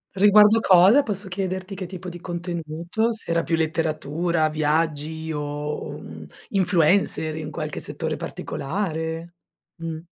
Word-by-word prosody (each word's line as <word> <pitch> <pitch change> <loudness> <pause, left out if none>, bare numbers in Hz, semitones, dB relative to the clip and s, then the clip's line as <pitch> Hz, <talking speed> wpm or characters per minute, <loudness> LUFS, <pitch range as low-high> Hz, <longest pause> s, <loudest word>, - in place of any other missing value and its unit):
Riguardo 210 +2 +7
cosa, 195 +8 +6
posso 200 -2 -3
chiederti 190 0 -3
che 185 - -5
tipo 185 0 -7
di 175 0 -9
contenuto? 175 +5 -2
Se 220 - -9
era 170 0 +2
più 165 - +1
letteratura, 160 0 0
viaggi 155 +1 -1
o, 150 0 -4
mhmm, - - -10 0.2
influencer 180 -4 +2
in 155 -1 -5
qualche 155 -2 -4
settore - - -3
particolare? 165 0 -4 0.5
Mh. 160 -1 -4
170 Hz, 125 wpm, -24 LUFS, 155-190 Hz, 0.5 s, Riguardo